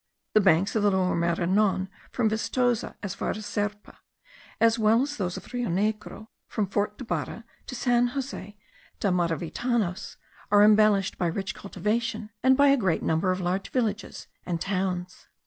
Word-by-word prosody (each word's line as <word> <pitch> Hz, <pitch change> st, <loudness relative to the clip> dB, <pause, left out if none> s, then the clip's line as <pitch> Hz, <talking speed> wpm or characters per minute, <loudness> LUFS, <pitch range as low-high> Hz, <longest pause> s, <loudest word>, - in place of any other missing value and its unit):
The 215 Hz, -, +6 dB
banks 195 Hz, +1 st, +3 dB
of 220 Hz, -, +2 dB
the 205 Hz, -, +4 dB
Lower 190 Hz, -2 st, +1 dB
Maranon, 185 Hz, +3 st, +1 dB, 0.2 s
from 240 Hz, -3 st, +1 dB
Vistoza 235 Hz, +2 st, 0 dB
as 200 Hz, -2 st, -3 dB
far -, -, -3 dB
as 215 Hz, 0 st, -4 dB
Serpa, 205 Hz, 0 st, -4 dB, 0.6 s
as 230 Hz, 0 st, +4 dB
well 220 Hz, +3 st, +4 dB
as 290 Hz, +1 st, -4 dB
those 180 Hz, -4 st, -2 dB
of -, -, -8 dB
the -, -, -15 dB
Rio 245 Hz, -2 st, -1 dB
Negro 215 Hz, +3 st, -2 dB, 0.2 s
from 215 Hz, -, -1 dB
Fort 205 Hz, +2 st, -2 dB
da 255 Hz, -, -7 dB
Bara 230 Hz, 0 st, -4 dB, 0.2 s
to 255 Hz, -, -6 dB
San 245 Hz, 0 st, +2 dB
Jose 245 Hz, -6 st, -6 dB, 0.4 s
da 200 Hz, -, +1 dB
Maravitanos, 180 Hz, +4 st, -1 dB, 0.3 s
are 205 Hz, 0 st, +6 dB
embellished 210 Hz, -2 st, +4 dB
by 175 Hz, -, +1 dB
rich 195 Hz, +3 st, -3 dB
cultivation, 215 Hz, +3 st, -3 dB
and 260 Hz, +1 st, +4 dB
by 285 Hz, 0 st, +6 dB
a 275 Hz, -, +5 dB
great 190 Hz, -9 st, 0 dB
number 160 Hz, +4 st, +1 dB
of 185 Hz, -, -1 dB
large 180 Hz, +2 st, -1 dB
villages 225 Hz, -4 st, -2 dB, 0.2 s
and 170 Hz, -2 st, -3 dB
towns. 185 Hz, -1 st, -3 dB
205 Hz, 170 wpm, -26 LUFS, 185-230 Hz, 0.6 s, The